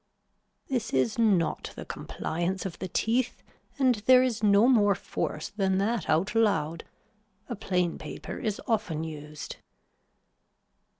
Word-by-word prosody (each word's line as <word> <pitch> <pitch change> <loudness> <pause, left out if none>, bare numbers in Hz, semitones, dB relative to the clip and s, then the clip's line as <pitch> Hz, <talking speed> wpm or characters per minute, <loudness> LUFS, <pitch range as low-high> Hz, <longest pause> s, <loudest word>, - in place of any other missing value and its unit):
This 240 -5 -2
is 130 - +1
not 200 -8 +1
the - - -7
compliance 175 +4 -3
of 190 - -5
the 185 - -3
teeth 235 +7 0 0.3
and 260 -2 +4
there 255 0 +8
is 245 -3 -1
no 205 +2 +5
more 205 -6 +5
force 155 -3 -4
than 195 -2 0
that 215 +3 0
out 170 +7 +2
loud. 170 -8 +1 0.6
A 240 - -4
plain 180 -4 -1
paper 155 - -7
is 215 -2 -2
often 205 -9 0
used. 150 -1 -7
200 Hz, 130 wpm, -28 LUFS, 165-225 Hz, 0.6 s, there